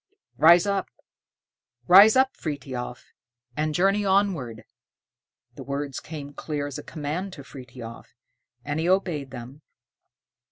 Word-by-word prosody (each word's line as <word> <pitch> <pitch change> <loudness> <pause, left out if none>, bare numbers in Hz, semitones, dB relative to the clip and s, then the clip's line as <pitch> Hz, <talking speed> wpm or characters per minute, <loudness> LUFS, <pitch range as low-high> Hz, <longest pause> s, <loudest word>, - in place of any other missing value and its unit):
"Rise 170 +3 +7
up, 200 -2 -1 1.0
rise 200 +5 +8
up, 265 0 +3
Frithiof, 130 -5 -6 0.4
and 155 0 -1
journey 195 +4 +2
onward." 190 - 0 0.9
The - - -9
words 140 0 -4
came 145 -3 -8
clear 145 0 -4
as 145 -2 -6
a - - -9
command 165 +5 -5
to 140 - -10
Frithiof, 125 -4 -10 0.6
and 145 +1 -2
he 165 +2 0
obeyed 175 -8 0
them. 130 +4 -10
150 Hz, 120 wpm, -25 LUFS, 135-185 Hz, 1.0 s, rise